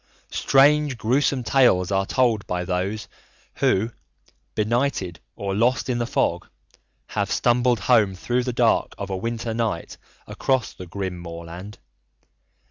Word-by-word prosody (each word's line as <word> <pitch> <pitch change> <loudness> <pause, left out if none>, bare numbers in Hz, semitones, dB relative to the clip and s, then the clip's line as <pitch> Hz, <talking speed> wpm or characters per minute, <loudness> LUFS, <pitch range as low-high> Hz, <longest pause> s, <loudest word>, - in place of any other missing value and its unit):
Strange, 145 0 +4
gruesome 130 +3 +1
tales 115 -9 +3
are 95 0 +1
told 120 -5 +1
by 90 0 -2
those 95 +4 -2 0.5
who, 110 +5 +2 0.6
benighted 110 -5 0 0.2
or 100 -1 -3
lost 120 +6 +1
in 120 -1 0
the 120 - -1
fog, - - 0 0.6
have - - -1
stumbled 120 -2 +2
home 105 -4 +3
through 120 +7 -1
the 125 - -2
dark 120 -1 +2
of 100 -1 -5
a - - -1
winter 115 +3 -3
night 110 -7 -2 0.3
across 130 -3 -1
the 90 - -10
grim 95 0 -4
moorland. 85 +4 -8
110 Hz, 130 wpm, -23 LUFS, 95-125 Hz, 0.6 s, Strange